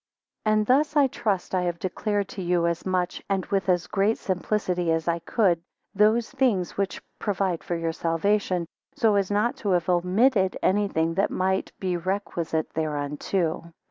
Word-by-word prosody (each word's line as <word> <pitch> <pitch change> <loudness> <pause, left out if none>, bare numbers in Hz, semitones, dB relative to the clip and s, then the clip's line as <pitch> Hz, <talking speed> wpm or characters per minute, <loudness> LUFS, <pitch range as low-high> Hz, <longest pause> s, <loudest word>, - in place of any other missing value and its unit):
AND 215 0 +3
thus 290 +6 +3
I 290 -2 +6
trust, 210 -9 -2
I 185 - +2
have 175 -1 -1
declared 200 +2 -2
to 195 - -6
you 175 -1 +1
as 170 +2 -1
much, 180 -1 -1
and 195 -1 0
with 195 -1 -1
as 175 -2 +2
great 205 +2 +1
simplicity 180 -2 -1
as 165 0 0
I 170 0 +1
could, 175 -1 +1 0.3
those, 215 +3 +3
things 245 -10 +1
which 195 -1 -2 0.2
provide 190 -4 -1
for 175 - -2
your 165 -1 -2
salvation, 180 +2 0 0.3
so 220 -2 +3
as 200 -2 +1
not 210 +4 +1
to 205 - -3
have 175 0 +1
omitted 190 +3 +3
any 205 +2 +3
thing 165 -2 0
that 195 +4 +1
might 190 +1 0
be 185 -2 -1
requisite 170 -3 -2
thereunto. 155 +3 -2
185 Hz, 170 wpm, -25 LUFS, 170-205 Hz, 0.3 s, I